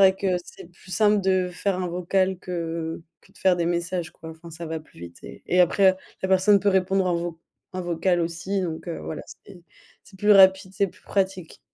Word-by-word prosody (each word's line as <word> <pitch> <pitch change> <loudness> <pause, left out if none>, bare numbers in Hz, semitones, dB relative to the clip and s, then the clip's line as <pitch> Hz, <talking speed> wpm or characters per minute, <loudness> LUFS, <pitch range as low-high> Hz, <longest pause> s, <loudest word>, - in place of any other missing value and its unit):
vrai 190 -1 +6
que 190 -2 0
c'est - - -12
plus 185 - -17
simple 210 0 +3
de 185 -1 +1
faire 190 +2 -1
un 185 - -2
vocal 185 +2 0
que, - - -10
heu, 165 -1 -4 0.2
que - - -24
de - - -18
faire 190 -1 +4
des 170 -1 0
messages 175 0 -2
quoi, 160 - -11
enfin 160 +1 -12
ça 165 +1 -7
va 160 0 -4
plus 155 - -20
vite 85 0 -10
et - - -11
et 180 - +3
après 190 +2 +4 0.3
la 190 - -1
personne 190 +2 +5
peut 205 - +1
répondre 190 0 +2
en 180 - +1
vo 170 -1 -4 0.3
en 185 - -4
vocal 175 +1 0
aussi, 170 +4 -2
donc 165 0 -5
heu, 170 - -4
voilà, 155 - -5 0.2
c'est 190 -3 -13 0.4
c'est 190 - -17
plus 210 +1 +5
rapide, 190 -1 +6
c'est 200 -1 +1
plus - - -20
pratique. 190 -4 -2
180 Hz, 225 wpm, -24 LUFS, 170-190 Hz, 0.4 s, vrai